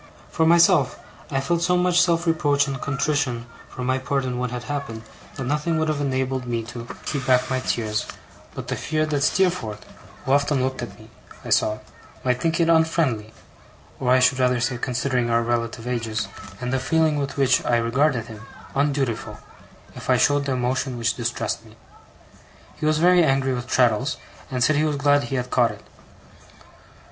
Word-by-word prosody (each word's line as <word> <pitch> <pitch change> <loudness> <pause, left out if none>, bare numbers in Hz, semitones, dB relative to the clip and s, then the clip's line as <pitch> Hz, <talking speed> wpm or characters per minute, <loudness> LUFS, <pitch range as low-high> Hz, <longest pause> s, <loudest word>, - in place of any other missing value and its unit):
For 160 - +2
myself, 170 -4 +4 0.3
I 135 - 0
felt 165 +5 0
so 180 +1 +2
much 180 -1 +3
self 170 -1 +2
reproach 145 -4 +2
and 135 -2 -5
contrition 140 -3 -1 0.2
for 125 - -7
my 130 +1 +1
part 135 +1 -1
in 125 -1 -3
what 125 0 -1
had 120 0 -5
happened, 140 -5 -5 0.3
that 135 - -4
nothing 150 +5 0
would 160 0 0
have 150 -1 -1
enabled 130 -2 -1
me 115 -1 -2
to 120 -1 -7 0.2
keep 140 -4 -3
back 125 -1 +3
my 130 - +1
tears 110 -4 -2 0.5
but - - -6
the - - -2
fear 155 0 -1
that 150 -2 -1
Steerforth, 145 - 0 0.4
who 130 - -1
often 140 -1 +2
looked 130 0 -2
at - - -7
me, - - -15 0.3
I - - -6
saw, 105 0 +2 0.5
might 125 -1 0
think 165 +1 0
it 165 - +3
unfriendly 160 -9 +2 0.7
or, 125 - -1
I 130 +1 +6
should 130 +1 +3
rather 125 -1 +2
say, 120 +1 -1
considering 125 -1 -1
our 115 0 +2
relative 115 -1 -2
ages, 115 -4 -2 0.3
and 125 0 -3
the 130 - +1
feeling 160 +2 +2
with 140 0 -4
which 135 -2 +3
I 120 - +2
regarded 120 +1 +1
him, 110 -2 -10 0.3
undutiful 135 -7 -1 0.6
if - - -9
I - - +5
showed 145 0 +2
the 135 - 0
emotion 125 +1 -1
which 115 -1 +1
distressed 115 -1 -3
me. 110 -1 -17 1.0
He 155 - -2
was 155 0 +3
very 175 +2 +5
angry 135 -2 +2
with 125 0 -4
Traddles, 125 +1 +2 0.3
and 125 -2 0
said 155 +2 +3
he 150 - +2
was 155 -2 0
glad 145 0 +3
he 135 - -4
had 125 -1 -3
caught - - +3
it. - - -10
130 Hz, 190 wpm, -23 LUFS, 120-150 Hz, 1.0 s, I